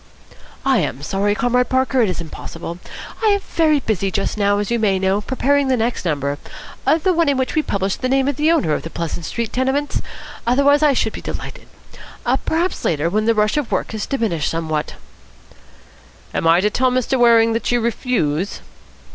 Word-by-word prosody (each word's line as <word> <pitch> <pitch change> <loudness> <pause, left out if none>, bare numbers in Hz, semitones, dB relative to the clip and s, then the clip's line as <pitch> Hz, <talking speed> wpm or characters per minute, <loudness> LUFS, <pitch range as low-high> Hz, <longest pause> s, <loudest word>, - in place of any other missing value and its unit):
"I 265 -3 +4
am 135 - -3
sorry, 200 +5 0
Comrade 245 +2 +1
Parker. 260 0 +2
It 220 - +2
is 180 - -3
impossible. 170 +1 -7 0.4
I - - +4
am 405 -1 +4
very 315 -6 +1
busy 205 -6 -1
just 195 0 -2
now, 205 -1 +2
as 205 +2 -2
you 235 - +1
may 200 -3 +2
know, 190 +2 +1
preparing 275 +4 +1
the 260 -1 +2
next 230 -3 -1
number, 145 -3 -1 0.6
the 375 - +3
one 335 -3 +2
in 280 - +1
which 260 -1 -1
we 310 - +2
publish 195 -8 -2
the 255 - -2
name 270 0 +2
of 285 - 0
the 305 +4 +2
owner 170 - +2
of - - -1
the 165 - -7
Pleasant 165 0 -4
Street 235 -2 -3
Tenements. 265 +3 0 0.5
Otherwise, 280 +4 +4
I 300 -2 +4
should 220 -4 0
be - - -7
delighted. - - -7 0.8
Perhaps 340 +3 0
later, 160 +1 0
when 215 +2 +1
the 230 0 +3
rush 210 +5 +2
of 295 -5 -2
work - - -1
has 215 -2 -4
diminished 220 - -1
somewhat." 155 -2 -2 1.4
"Am - - 0
I 165 +2 +5
to 210 +2 +1
tell 255 +3 +2
Mr. 255 +1 0
Waring 230 -1 +5
that 230 - -1
you 245 - +3
refuse?" 215 - -1
230 Hz, 195 wpm, -19 LUFS, 190-265 Hz, 1.4 s, I